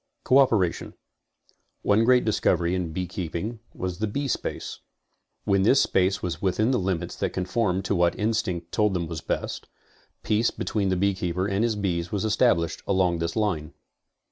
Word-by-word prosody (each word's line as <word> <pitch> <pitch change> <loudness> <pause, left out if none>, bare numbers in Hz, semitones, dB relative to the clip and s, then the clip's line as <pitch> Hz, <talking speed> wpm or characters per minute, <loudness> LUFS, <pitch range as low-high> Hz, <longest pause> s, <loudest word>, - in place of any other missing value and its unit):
CO 130 +2 +5
OPERATION 105 -10 +1 0.9
One 105 +3 +3
great 125 0 +4
discovery 90 -5 +1
in 90 -3 -2
beekeeping 90 +5 -4
was 90 -1 -5
the 110 - 0
beespace. 140 +5 -3 0.6
When 100 -1 +2
this 130 +8 +5
space 95 +1 +1
was 85 -3 -3
within 100 +5 +1
the 125 - +2
limits 90 -2 -2
that - - -2
conform 95 0 0
to 95 - -1
what 85 -2 +2
instinct 105 -6 -1
told 105 -3 +1
them 85 -1 -1
was 80 0 -6
best, - - -3 0.6
peace 110 +2 +2
between 100 -3 -2
the 95 - +1
beekeeper 95 -1 0
and 100 +1 0
his 115 -2 +1
bees 85 -4 -2
was 105 +1 -1
established 110 -6 +2
along 95 -3 +2
this 85 0 -2
line. 95 -9 -1
95 Hz, 160 wpm, -25 LUFS, 90-110 Hz, 0.9 s, CO